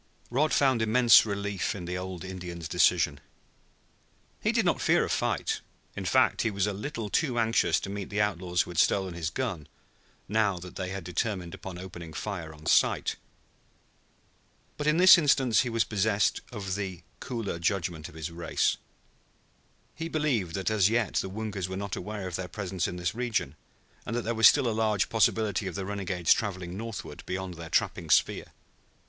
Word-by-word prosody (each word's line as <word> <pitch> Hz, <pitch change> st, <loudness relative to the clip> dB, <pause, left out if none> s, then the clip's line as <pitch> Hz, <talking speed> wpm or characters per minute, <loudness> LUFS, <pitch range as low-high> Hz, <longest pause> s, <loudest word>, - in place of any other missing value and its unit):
Rod 150 Hz, +5 st, +2 dB
found 130 Hz, -5 st, +3 dB
immense 115 Hz, 0 st, +6 dB
relief 100 Hz, -3 st, -2 dB
in 90 Hz, -3 st, -6 dB
the 90 Hz, +1 st, -4 dB
old 90 Hz, -1 st, -5 dB
Indian's 90 Hz, -3 st, -6 dB
decision. 70 Hz, -1 st, +2 dB, 1.2 s
He -, -, +2 dB
did -, -, +1 dB
not -, -, +1 dB
fear -, -, +3 dB
a -, -, -6 dB
fight; -, -, -1 dB, 0.3 s
in -, -, -5 dB
fact, -, -, +3 dB
he 115 Hz, -, +1 dB
was 100 Hz, -2 st, 0 dB
a 105 Hz, -, -1 dB
little 115 Hz, +2 st, -5 dB
too 125 Hz, +3 st, 0 dB
anxious 115 Hz, 0 st, +2 dB
to -, -, -5 dB
meet 100 Hz, -1 st, -5 dB
the 105 Hz, -, -2 dB
outlaws 90 Hz, -4 st, +1 dB
who -, -, -9 dB
had 85 Hz, -, -1 dB
stolen 95 Hz, -2 st, +2 dB
his 85 Hz, -2 st, -3 dB
gun, 95 Hz, -, -3 dB, 0.6 s
now 105 Hz, -2 st, +1 dB
that 90 Hz, +1 st, -10 dB
they 95 Hz, -1 st, -4 dB
had 95 Hz, -1 st, -5 dB
determined 90 Hz, 0 st, -3 dB
upon 95 Hz, -2 st, -8 dB
opening 85 Hz, -3 st, -9 dB
fire 80 Hz, 0 st, -5 dB
on 75 Hz, 0 st, -15 dB
sight. -, -, +3 dB, 1.6 s
But 145 Hz, -, -3 dB
in 155 Hz, +1 st, +3 dB
this 185 Hz, 0 st, +9 dB
instance 135 Hz, -6 st, +3 dB
he 125 Hz, -, -2 dB
was 115 Hz, -1 st, +2 dB
possessed 105 Hz, 0 st, +1 dB
of 100 Hz, -5 st, -4 dB
the 95 Hz, -3 st, -4 dB, 0.2 s
cooler 115 Hz, -9 st, -4 dB
judgment 85 Hz, -3 st, -2 dB
of -, -, -16 dB
his 80 Hz, +1 st, -5 dB
race. 85 Hz, 0 st, 0 dB, 1.2 s
He 165 Hz, 0 st, -5 dB
believed 130 Hz, -, 0 dB
that 95 Hz, +2 st, -1 dB
as 105 Hz, -2 st, +4 dB
yet 115 Hz, -1 st, 0 dB
the 95 Hz, -, -1 dB
Woongas 100 Hz, -2 st, -4 dB
were 95 Hz, -, -4 dB
not 100 Hz, -1 st, -4 dB
aware 105 Hz, 0 st, -5 dB
of 90 Hz, -, -4 dB
their 90 Hz, 0 st, -4 dB
presence 95 Hz, -1 st, -3 dB
in 90 Hz, -, -5 dB
this 90 Hz, -1 st, -2 dB
region, 115 Hz, -, -2 dB, 0.5 s
and 115 Hz, -, -4 dB
that 120 Hz, -, -1 dB
there 115 Hz, -, -1 dB
was 110 Hz, -1 st, +7 dB
still 140 Hz, -4 st, +4 dB
a -, -, +1 dB
large 110 Hz, -2 st, +1 dB
possibility 110 Hz, -3 st, +1 dB
of 90 Hz, -, -5 dB
the 95 Hz, -, -3 dB
renegades 95 Hz, -4 st, +1 dB
traveling 95 Hz, -4 st, -4 dB
northward 115 Hz, 0 st, -6 dB
beyond 95 Hz, 0 st, -4 dB
their 85 Hz, -1 st, -9 dB
trapping -, -, 0 dB
sphere. -, -, +2 dB
100 Hz, 185 wpm, -28 LUFS, 90-110 Hz, 1.6 s, this